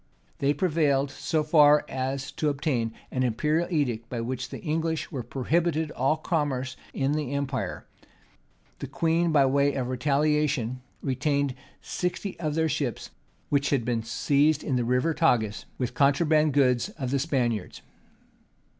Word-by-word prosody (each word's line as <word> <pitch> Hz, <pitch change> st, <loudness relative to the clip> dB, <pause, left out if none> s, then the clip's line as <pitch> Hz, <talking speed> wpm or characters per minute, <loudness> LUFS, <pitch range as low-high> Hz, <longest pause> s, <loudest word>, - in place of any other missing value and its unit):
They 140 Hz, +1 st, +2 dB
prevailed 145 Hz, -6 st, +1 dB
so 155 Hz, +1 st, -1 dB
far 150 Hz, -1 st, +5 dB
as 135 Hz, +1 st, -3 dB
to 155 Hz, -, 0 dB
obtain 135 Hz, -5 st, -1 dB, 0.2 s
an 130 Hz, -, -1 dB
imperial 150 Hz, +8 st, +1 dB
edict, 120 Hz, -8 st, -1 dB
by 120 Hz, -, -3 dB
which 125 Hz, +2 st, -4 dB
the -, -, -7 dB
English 160 Hz, 0 st, -1 dB
were 135 Hz, -, -3 dB
prohibited 155 Hz, +6 st, 0 dB
all 135 Hz, +5 st, +1 dB
commerce 145 Hz, -5 st, -1 dB, 0.2 s
in 135 Hz, +1 st, 0 dB
the 145 Hz, -2 st, -2 dB
empire: 140 Hz, -2 st, -3 dB, 0.9 s
the -, -, -5 dB
queen, 165 Hz, +1 st, +1 dB
by 145 Hz, -3 st, +5 dB
way 140 Hz, +1 st, +2 dB
of 125 Hz, -2 st, -2 dB
retaliation, 140 Hz, -2 st, +1 dB, 0.2 s
retained 140 Hz, +1 st, 0 dB, 0.3 s
sixty 180 Hz, +2 st, -3 dB
of 155 Hz, -3 st, -2 dB
their 160 Hz, 0 st, +2 dB
ships, -, -, -3 dB, 0.4 s
which 140 Hz, -1 st, +1 dB
had 130 Hz, -5 st, +1 dB
been 120 Hz, -1 st, 0 dB
seized 145 Hz, +6 st, +1 dB
in 135 Hz, -, -1 dB
the 125 Hz, -, +1 dB
River 125 Hz, +7 st, +1 dB
Tagus 115 Hz, -10 st, +1 dB
with 125 Hz, -2 st, -2 dB
contraband 150 Hz, +1 st, +3 dB
goods 130 Hz, +3 st, +3 dB
of 130 Hz, -4 st, -3 dB
the 140 Hz, -, +1 dB
Spaniards. 125 Hz, -, -1 dB
140 Hz, 145 wpm, -27 LUFS, 130-155 Hz, 0.9 s, far